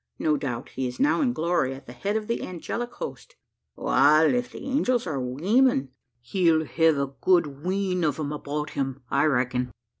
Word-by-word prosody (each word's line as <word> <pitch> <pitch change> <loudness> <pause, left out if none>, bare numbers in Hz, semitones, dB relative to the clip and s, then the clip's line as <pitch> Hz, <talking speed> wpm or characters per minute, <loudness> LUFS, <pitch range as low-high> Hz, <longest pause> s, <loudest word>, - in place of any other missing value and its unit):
No 155 -1 +1
doubt 130 -5 -4
he 130 0 -3
is 125 - -7
now 290 +3 +3
in 260 -4 +2
glory, 165 - 0
at 135 - -13
the 120 - -10
head 200 - -1
of 215 - -4
the 235 +2 -2
angelic 230 +7 -4
host." - - -8 0.4
"Wal 155 - +4
if 245 0 -1
the - - -9
angels 255 -3 +1
are 150 -6 -2
weemen, 150 - +2 0.3
he'll 160 +3 +2
hev 160 -1 +3
a 140 -1 -2
good 155 -6 +2
wheen 185 -1 0
o' 155 - +3
'em 150 -2 -3
about 150 0 -4
him, 135 -1 -3
I 140 +2 +3
reck'n. 125 -3 +1
155 Hz, 185 wpm, -26 LUFS, 135-200 Hz, 0.4 s, Wal